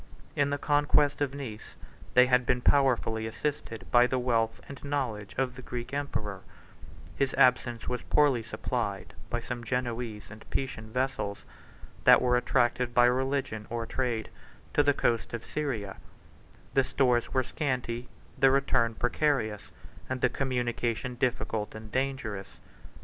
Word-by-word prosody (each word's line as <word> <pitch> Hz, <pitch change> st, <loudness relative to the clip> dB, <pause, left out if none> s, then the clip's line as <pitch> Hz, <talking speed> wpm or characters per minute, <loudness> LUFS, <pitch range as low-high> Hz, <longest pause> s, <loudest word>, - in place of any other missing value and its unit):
In 145 Hz, 0 st, +2 dB
the 145 Hz, -, 0 dB
conquest 145 Hz, 0 st, +2 dB
of 140 Hz, -1 st, 0 dB
Nice, 115 Hz, -7 st, -7 dB, 0.4 s
they 125 Hz, 0 st, +8 dB
had 125 Hz, 0 st, +3 dB
been 125 Hz, 0 st, +1 dB
powerfully 120 Hz, -5 st, +2 dB
assisted 115 Hz, -3 st, -4 dB
by 120 Hz, 0 st, +6 dB
the 130 Hz, -, 0 dB
wealth 115 Hz, -3 st, +1 dB
and 140 Hz, -1 st, -10 dB
knowledge 115 Hz, -9 st, -3 dB
of 130 Hz, -2 st, 0 dB
the 130 Hz, -, -9 dB
Greek 125 Hz, +1 st, -6 dB
emperor: 110 Hz, -9 st, -3 dB, 0.7 s
his 135 Hz, -1 st, 0 dB
absence 120 Hz, -2 st, +3 dB
was 125 Hz, -1 st, -2 dB
poorly 145 Hz, -5 st, +3 dB
supplied 115 Hz, -, -3 dB, 0.2 s
by 120 Hz, -, -1 dB
some 120 Hz, 0 st, -5 dB
Genoese 120 Hz, -3 st, -3 dB
and 105 Hz, +1 st, -11 dB
Pisan 120 Hz, -5 st, -3 dB
vessels, 125 Hz, -5 st, -2 dB, 0.6 s
that -, -, +8 dB
were 125 Hz, 0 st, +2 dB
attracted 125 Hz, 0 st, +1 dB
by 120 Hz, -, +7 dB
religion 130 Hz, -3 st, 0 dB
or 115 Hz, -1 st, -3 dB
trade 120 Hz, -3 st, -2 dB, 0.4 s
to -, -, +5 dB
the 145 Hz, -1 st, +3 dB
coast 115 Hz, 0 st, 0 dB
of 115 Hz, -, -7 dB
Syria: 120 Hz, -10 st, -3 dB, 0.8 s
the 135 Hz, -, +4 dB
stores 125 Hz, -2 st, +1 dB
were 130 Hz, -, +2 dB
scanty, 125 Hz, -4 st, -3 dB, 0.3 s
the 135 Hz, -, +6 dB
return 130 Hz, -4 st, +2 dB
precarious, 120 Hz, -5 st, 0 dB, 0.4 s
and 130 Hz, -1 st, -2 dB
the -, -, +4 dB
communication 125 Hz, -2 st, -1 dB
difficult 120 Hz, -4 st, -1 dB
and 110 Hz, 0 st, -9 dB
dangerous. 130 Hz, -7 st, -3 dB
125 Hz, 145 wpm, -29 LUFS, 115-135 Hz, 0.8 s, they